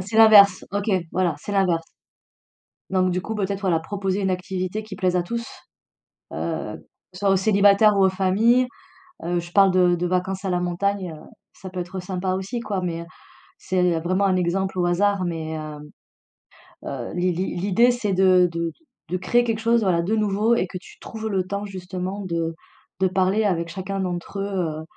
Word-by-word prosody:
C'est 195 +4 -4
l'inverse. 205 -4 +7
OK, 205 +2 -2 0.2
voilà, 175 -3 +1
c'est - - -7
l'inverse. 175 -4 +1 1.0
Donc, 185 -1 +2
du 180 +1 -1
coup, 220 +4 -5
peut-être, 200 -1 -2
voilà, 175 -5 +1
proposer 195 +2 -2
une 190 -1 0
activité 185 +3 -3
qui 215 -2 -9
plaise 180 -1 +1
à 175 - +2
tous, 235 +6 -4 0.9
heu, - - -4 0.4
soit 195 +1 0
aux 195 - +4
célibataires 200 +1 +4
ou 195 - +4
aux - - +6
familles. 215 +7 +3 0.6
Heu, 175 +1 -1
je 175 0 -7
parle 195 -1 +6
de 180 -1 +4
de 175 +1 -1
vacances 185 +2 -1
à 190 - -1
la 180 0 0
montagne. 180 0 -1
Heu, - - -13 0.3
ça 190 - -10
peut 185 -1 -5
être 185 +2 -5
sympa 185 0 -2
aussi, 200 +6 -4
quoi, 205 -4 -3
mais 170 -1 -3
heu, - - -10 0.5
c'est 180 -3 +1
vraiment 185 +4 0
un 190 -1 +2
exemple 185 +2 -1
au 175 - +1
hasard, 195 +2 +1
mais 160 -2 -4
heu 155 -1 -7 1.1
heu, 130 -4 -5
l'i 180 +1 +1
l'idée, 190 +6 +2
c'est 220 -5 -2
de 185 -1 +4 0.6
de 185 - -1
créer 240 +6 +2
quelque 225 -1 -1
chose, 230 +1 +2
voilà, 175 -3 +2
de 210 +6 0
nouveau 215 +2 +2
et 185 - 0
que 185 - -7
tu 180 - -15
trouves 220 -1 -6
le 190 -2 0
temps, 200 +1 -3
justement, 185 +1 -5
de 165 -2 -2 0.4
de 190 - +3
parler 190 +3 +1
avec 170 -3 0
chacun 195 +2 -4
d'entre 180 +1 -4
eux, 195 - -1
heu 165 -6 -3
185 Hz, 185 wpm, -23 LUFS, 180-200 Hz, 1.1 s, l'inverse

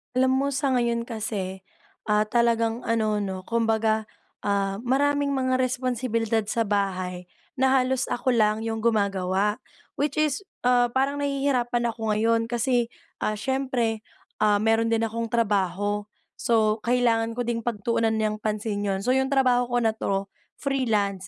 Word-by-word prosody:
Alam 260 0 +3
mo 270 +1 +1
sa 275 0 0
ngayon 235 -2 +1
kasi, 210 -5 -4 0.5
ah, 210 0 +3
talagang 230 0 +1
ano 215 -2 +1
'no 190 -2 -4
kumbaga, 220 -1 +1 0.4
ah, 195 -1 0
maraming 280 +3 +1
mga 260 -1 +1
responsibilidad 245 -3 0
sa 230 +1 +1
bahay 185 -3 -2 0.3
na 265 - +4
halos 260 0 +1
ako 255 +1 0
lang 215 -2 +2
‘yong 225 0 -2
gumagawa. 200 -1 +1 0.4
Which 290 +1 0
is, 305 -2 +1 0.2
ah, 245 -1 +4
parang 270 +4 0
nahihirapan 255 -4 0
ako 220 -2 -2
ngayon 230 +1 +2
kasi, 240 0 +1 0.3
ah, 215 - -1
siyempre, 250 -2 -1 0.4
ah, 210 -1 +4
meron 225 +2 +2
din 225 0 +1
akong 230 +1 -2
trabaho. 205 -2 0 0.3
So 220 -2 +2
kailangan 230 -2 +2
ko 245 - -1
din 235 -1 -1
pagtuunan 225 0 0
niyang 215 -1 -1
pansin 210 -1 -2
yun. 195 0 -1
So 250 - +2
yung 265 +1 +2
trabaho 255 -3 +3
ko 245 0 0
na 225 - +3
‘to, 195 0 -2 0.2
freelance 210 -9 -1
230 Hz, 145 wpm, -25 LUFS, 210-250 Hz, 0.5 s, na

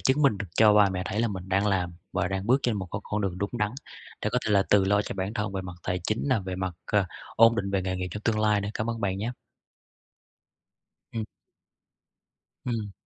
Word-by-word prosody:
chứng 140 +3 +2
minh 120 -8 +4
được 100 - -4
cho 105 -1 +6
ba 105 -1 +6
mẹ 90 -1 -2
thấy 105 +3 -1
là 115 - +2
mình 95 -2 -6
đang 100 +2 +2
làm 90 -3 +1 0.2
và - - 0
đang 95 +1 -3
bước 130 +3 +4
trên 120 -3 +1
một 95 - -4
cái 100 - -3
con 105 0 -2
đường 95 -3 -2
đúng 100 +1 -2
đắn 105 -4 0 0.5
để - - +1
có - - +3
thể - - 0
là 100 -1 +5
tự 100 -2 +6
lo 100 +1 +3
cho - - -5
bản 95 +3 -3
thân 105 -1 -2
về 95 -1 -3
mặt 90 -1 -7
tài 90 0 -1
chính 110 +5 -1
nè, 130 - +3
về 95 -1 -4
mặt, 95 -2 -2
ờ 105 -2 +2 0.3
ổn 115 +1 +7
định 100 0 -1
về 95 -1 +1
nghề 95 0 -2
nghiệp 90 0 -3
trong 105 +4 -6
tương 110 -1 +1
lai 105 -1 +3
nữa. 100 - -3
Cảm 110 +2 -1
ơn 115 - -4
bạn 95 -2 -1
nhé. 115 +4 -2 1.8
Ừm. 110 -1 -2 1.4
Ừm. 110 -5 -2
100 Hz, 245 wpm, -27 LUFS, 95-110 Hz, 1.8 s, ổn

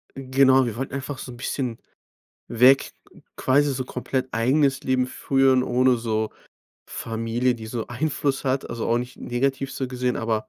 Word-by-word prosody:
Genau, 130 0 +4
wir 115 -3 -3
wollten 130 +2 -5
einfach 140 0 -4
so 130 - -7
'n 120 - -11
bisschen 125 -2 -3 0.7
weg, 125 +3 +4 0.4
quasi 140 +2 +2
so 130 0 -3
komplett 130 +1 -3
eigenes 135 +4 +2
Leben 130 -1 +1
führen, 135 0 +2
ohne 125 0 +3
so 110 -2 -1 0.6
Familie, 115 +2 -1
die 110 -2 -9
so 115 0 -4
Einfluss 140 +2 -1
hat. 135 0 -1
Also 115 -1 -4
auch 115 +1 +2
nicht 125 +1 -6
negativ 135 +2 -2
so 130 - -3
gesehen, 125 0 -1
aber 110 -1 -2
130 Hz, 160 wpm, -24 LUFS, 120-135 Hz, 0.7 s, Genau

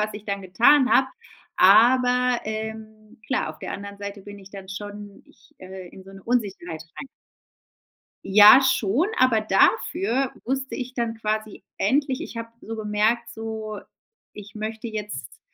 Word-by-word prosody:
was 215 0 -2
ich 210 0 -9
dann 200 -1 -4
getan 240 +9 +4
habe, 265 - +5 0.5
aber, 250 +5 +4
ähm 220 0 -7
klar, 265 - -1
auf - - -14
der - - -6
anderen 200 0 -8
Seite 200 0 -7
bin 205 +1 -11
ich 195 0 -15
dann 195 -1 -11
schon 205 +1 -9
ich - - -25
äh, 185 -1 -10
in 190 +2 -14
so 195 - -14
'ne 195 0 -13
Unsicherheit 195 -9 -3
rein. 275 - -8 1.2
Ja, 210 +6 +8
schon, 260 - +1
aber 250 -4 +4
dafür 220 +4 +1
wusste 265 +1 -3
ich 255 -1 -6
dann 235 -2 -2
quasi 215 -2 -3
endlich 265 +4 0
ich - - -8
habe 230 0 -5
so 225 - -7
gemerkt, 220 +2 0
so, 220 -2 -6 0.5
ich 210 0 -12
möchte 220 +2 -5
jetzt 210 -1 -7
215 Hz, 155 wpm, -23 LUFS, 200-240 Hz, 1.2 s, Ja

